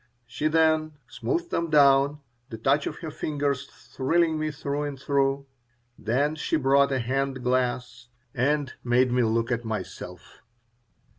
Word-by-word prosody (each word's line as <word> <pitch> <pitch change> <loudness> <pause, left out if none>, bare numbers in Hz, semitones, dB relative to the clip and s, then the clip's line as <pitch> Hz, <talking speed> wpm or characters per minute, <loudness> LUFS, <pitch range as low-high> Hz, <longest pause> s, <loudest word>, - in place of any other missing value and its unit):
She 120 +6 -2
then 155 0 +2
smoothed 345 - -3
them 170 0 -1
down, 140 0 +4 0.3
the 115 - -7
touch 135 +6 +1
of - - -4
her 155 - -5
fingers 145 -2 -2
thrilling 160 +3 -1
me 155 0 -1
through 145 -1 -3
and 145 -2 -4
through. 140 0 0 0.5
Then 130 +8 0
she 155 - -2
brought 140 0 +3
a 135 - +1
hand 130 +1 -2
glass 125 -1 -1 0.3
and 140 +2 0
made 125 +1 +3
me 125 0 +2
look 115 +1 +1
at 120 -1 -1
myself. 110 -1 -7
140 Hz, 145 wpm, -26 LUFS, 125-150 Hz, 0.5 s, down